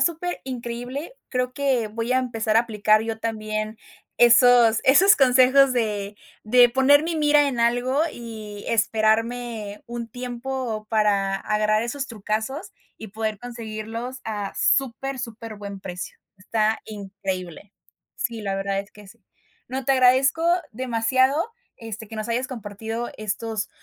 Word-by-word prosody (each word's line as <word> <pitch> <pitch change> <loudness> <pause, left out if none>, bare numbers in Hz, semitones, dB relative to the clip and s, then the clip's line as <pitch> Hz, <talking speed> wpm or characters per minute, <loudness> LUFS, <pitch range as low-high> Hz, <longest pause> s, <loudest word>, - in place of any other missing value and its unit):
superincreíble, 265 - -3 0.2
creo 250 -1 -1
que 260 -5 0
voy 230 +3 -2
a 255 - +4
empezar 225 -3 0
a - - +7
aplicar 215 -2 +2
yo 225 -1 -4
también 215 -1 -3 0.4
esos, 240 -1 +6
esos 390 +10 +7
consejos 260 +1 +5
de 210 -3 -2 0.3
de 245 +3 +6
poner 265 +3 +5
mi 330 0 -2
mira 295 -1 +4
en 245 -3 -2
algo, 245 +4 +2
y 220 -5 -9
esperarme 225 -1 0
un 235 -1 -6
tiempo 245 -2 -5
para 205 -3 +2
agarrar 215 +2 +1
esos 270 +4 -3
trucazos, 220 - -4 0.2
y 220 - -9
poder 215 +1 -3
conseguirlos 230 +2 -6
a 205 -3 -4
super 270 +1 0
superbuen 215 -4 -7
precio, 180 -1 -7 0.2
está 215 +3 0
increíble. 195 -3 -6 0.4
Sí, 230 -3 -3
la 200 -2 -2
verdad 195 0 -2
es 200 +1 -13
que 210 -1 -15
sí. 225 +3 -17 0.5
No, 260 +1 -4
te 270 - +3
agradezco 265 +5 +4 0.2
demasiado, 260 - +1 0.3
este, 220 -1 -8
que 225 - -8
nos 215 +1 -4
hayas 245 +2 0
compartido 225 -1 -5
estos 215 0 -3
230 Hz, 135 wpm, -23 LUFS, 215-255 Hz, 0.5 s, a